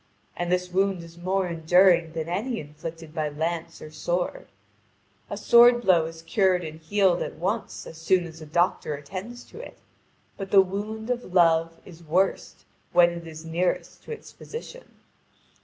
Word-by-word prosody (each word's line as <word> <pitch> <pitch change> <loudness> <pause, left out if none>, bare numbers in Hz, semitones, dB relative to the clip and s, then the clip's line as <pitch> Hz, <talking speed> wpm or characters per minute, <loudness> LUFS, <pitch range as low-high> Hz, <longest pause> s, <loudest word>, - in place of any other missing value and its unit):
And 175 0 -2
this 180 0 0
wound 190 -1 +1
is 165 0 -13
more 185 +1 0
enduring 170 0 +4
than 160 -1 -3
any 220 +8 -2
inflicted 160 +2 -9
by 155 -2 -1
lance 165 +2 -4
or 155 - -10
sword. 175 - -2 0.8
A - - -4
sword 240 0 +6
blow 175 -5 +4
is 165 0 -10
cured 185 +1 +2
and 160 0 -7
healed 185 +1 +2
at - - -4
once 200 +5 -3
as 160 - -10
soon 175 +2 +2
as 160 -1 -11
a 155 - -9
doctor 170 -1 +1
attends 190 +12 -8
to - - -13
it, - - -10 0.6
but 195 -1 -6
the 200 - +6
wound 210 +4 -1
of 240 -7 -4
love 165 -1 +4
is 170 -2 -13
worst 180 +5 -1 0.3
when 175 0 +6
it 170 -1 -8
is 160 0 -9
nearest 170 +2 -2
to - - -8
its 450 - -8
physician. - - -10
175 Hz, 170 wpm, -26 LUFS, 165-195 Hz, 0.8 s, sword